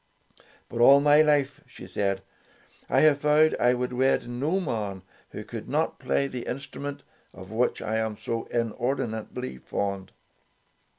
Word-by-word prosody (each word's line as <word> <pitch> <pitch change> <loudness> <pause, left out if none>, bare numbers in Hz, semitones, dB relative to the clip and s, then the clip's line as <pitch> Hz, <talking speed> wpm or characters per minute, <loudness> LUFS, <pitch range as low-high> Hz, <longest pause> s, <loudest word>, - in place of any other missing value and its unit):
"But 120 - -3
all 140 +3 +8
my 145 +1 +6
life,'" 145 -2 +2
she - - -12
said, 100 -1 -2 0.7
"I - - +3
have 150 -2 +5
vowed 150 +1 +4
I 125 +1 +4
would 125 0 -3
wed 130 +1 +2
no 140 +10 -1
man 105 - -3 0.3
who - - -7
could - - -8
not - - 0
play 140 - 0
the 125 -3 -6
instrument 140 +2 -6 0.3
of 95 +1 -11
which 120 +2 0
I 110 0 -1
am 110 -1 -2
so 115 0 -3
inordinately 115 - -3
fond." 100 +5 -3
120 Hz, 150 wpm, -26 LUFS, 110-140 Hz, 0.7 s, all